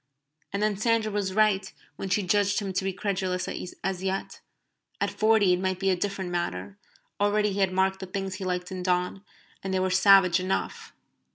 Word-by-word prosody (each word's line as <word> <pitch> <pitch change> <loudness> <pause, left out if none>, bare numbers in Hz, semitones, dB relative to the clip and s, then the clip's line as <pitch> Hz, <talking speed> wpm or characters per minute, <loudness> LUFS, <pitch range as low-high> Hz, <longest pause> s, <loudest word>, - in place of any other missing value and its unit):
And 200 +2 -1
then 215 -2 +1
Sandra 225 0 +1
was 200 -2 -2
right 215 -2 +2 0.2
when 195 - -5
she 195 +2 +1
judged 200 +2 +2
him 195 -2 -4
to 190 - -1
be 195 - 0
credulous 185 -1 -2
as 185 0 -4
yet. 190 0 -3 0.6
At 200 0 0
forty 210 -2 +3
it 180 - 0
might 185 0 -1
be 195 -1 +2
a - - +2
different 190 -1 -3
matter. 100 - -3 0.4
Already 205 0 +2
he 200 - -3
had 190 -1 +2
marked 190 +1 +1
the 190 - -6
things 195 0 -4
he - - -6
liked 180 -1 -3
in 185 -1 -4
Donne, 180 +1 -1 0.4
and 195 - -3
they 190 - +1
were 185 0 0
savage 190 -1 +6
enough. 185 +1 -3
190 Hz, 195 wpm, -27 LUFS, 185-200 Hz, 0.6 s, savage